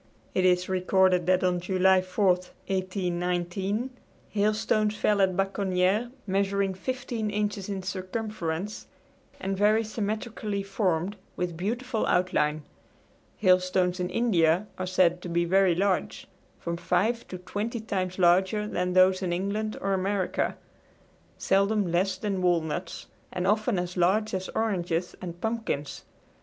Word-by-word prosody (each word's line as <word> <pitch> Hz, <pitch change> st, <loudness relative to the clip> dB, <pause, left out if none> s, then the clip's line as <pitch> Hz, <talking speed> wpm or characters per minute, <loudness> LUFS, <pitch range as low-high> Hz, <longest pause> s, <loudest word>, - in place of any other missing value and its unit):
It 185 Hz, -, +2 dB
is 180 Hz, 0 st, +3 dB
recorded 185 Hz, -1 st, +2 dB
that 185 Hz, 0 st, +3 dB
on 180 Hz, -1 st, +2 dB
July 185 Hz, +1 st, +3 dB
4, 185 Hz, +3 st, -1 dB
1819, 185 Hz, +3 st, -1 dB, 0.4 s
hailstones 215 Hz, 0 st, +1 dB
fell 210 Hz, -1 st, +2 dB
at 185 Hz, -2 st, +2 dB
Baconniere 195 Hz, +2 st, +1 dB, 0.2 s
measuring 195 Hz, 0 st, 0 dB
fifteen 240 Hz, +1 st, -3 dB
inches 205 Hz, -1 st, -2 dB
in 195 Hz, -2 st, -3 dB
circumference, 185 Hz, -1 st, -4 dB, 0.5 s
and 195 Hz, +1 st, -2 dB
very 210 Hz, +3 st, +3 dB
symmetrically 215 Hz, -1 st, -3 dB
formed, 195 Hz, -1 st, -1 dB, 0.2 s
with 175 Hz, -2 st, -3 dB
beautiful 230 Hz, +6 st, -2 dB
outline. 155 Hz, -4 st, +1 dB, 0.7 s
Hailstones 185 Hz, -1 st, +2 dB
in 180 Hz, 0 st, -1 dB
India 180 Hz, -4 st, +2 dB
are 185 Hz, -, -2 dB
said 180 Hz, -1 st, +2 dB
to 180 Hz, -, -6 dB
be 170 Hz, 0 st, +1 dB
very 190 Hz, 0 st, +4 dB
large 190 Hz, +1 st, 0 dB, 0.3 s
from 170 Hz, 0 st, -4 dB
five 185 Hz, +7 st, 0 dB
to 185 Hz, -, -6 dB
twenty 210 Hz, +6 st, -4 dB
times 190 Hz, -4 st, -3 dB
larger 190 Hz, +4 st, +3 dB
than 180 Hz, -3 st, -1 dB
those 185 Hz, +1 st, +5 dB
in 180 Hz, -2 st, -1 dB
England 200 Hz, +4 st, -2 dB
or 195 Hz, 0 st, 0 dB
America 190 Hz, 0 st, -1 dB, 0.8 s
seldom 200 Hz, -1 st, +2 dB
less 185 Hz, +2 st, +1 dB
than 195 Hz, -1 st, -2 dB
walnuts 175 Hz, -1 st, -1 dB, 0.3 s
and 180 Hz, -, -2 dB
often 215 Hz, +1 st, +2 dB
as 180 Hz, 0 st, -3 dB
large 195 Hz, +5 st, +2 dB
as 190 Hz, 0 st, -3 dB
oranges 180 Hz, -5 st, -1 dB
and 175 Hz, -1 st, -7 dB
pumpkins. 220 Hz, -10 st, -3 dB
190 Hz, 130 wpm, -27 LUFS, 180-210 Hz, 0.8 s, those